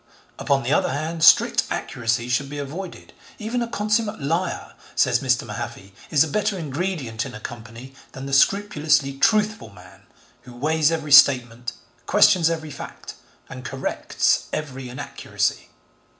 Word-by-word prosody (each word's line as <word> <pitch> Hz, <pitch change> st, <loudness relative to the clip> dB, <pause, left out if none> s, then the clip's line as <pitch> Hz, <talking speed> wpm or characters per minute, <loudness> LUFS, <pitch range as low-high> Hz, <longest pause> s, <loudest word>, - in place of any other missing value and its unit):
Upon 140 Hz, -1 st, +1 dB
the 130 Hz, +4 st, 0 dB
other -, -, +2 dB
hand, 160 Hz, +4 st, -3 dB
strict -, -, +6 dB
accuracy 120 Hz, 0 st, -2 dB
should 130 Hz, +3 st, -1 dB
be 145 Hz, -, -7 dB
avoided. 160 Hz, +7 st, -7 dB, 0.2 s
'Even 230 Hz, +3 st, -3 dB
a 235 Hz, -, -1 dB
consummate 215 Hz, -1 st, -1 dB
liar,' 165 Hz, +6 st, -2 dB, 0.2 s
says -, -, +3 dB
Mr. -, -, +1 dB
Mahaffy, 95 Hz, 0 st, -7 dB, 0.2 s
is 150 Hz, -2 st, +4 dB
a -, -, -3 dB
better 210 Hz, +5 st, -1 dB
ingredient 150 Hz, -7 st, -3 dB
in -, -, -8 dB
a -, -, -8 dB
company 115 Hz, +3 st, -10 dB, 0.2 s
than 135 Hz, -, -7 dB
'the 135 Hz, -, -6 dB
scrupulously 155 Hz, -4 st, +2 dB
truthful 215 Hz, -, +2 dB
man, 90 Hz, -3 st, -17 dB, 0.3 s
who 125 Hz, -1 st, -14 dB
weighs 155 Hz, +4 st, +1 dB
every 155 Hz, -2 st, -3 dB
statement, 125 Hz, -3 st, +5 dB, 0.3 s
questions 170 Hz, -3 st, +5 dB
every 160 Hz, -2 st, -4 dB
fact, 140 Hz, -, -9 dB, 0.3 s
and 130 Hz, -, -9 dB
corrects 130 Hz, +2 st, -1 dB
every 135 Hz, -4 st, -5 dB
inaccuracy.' 125 Hz, -, -3 dB
145 Hz, 145 wpm, -23 LUFS, 125-170 Hz, 0.3 s, strict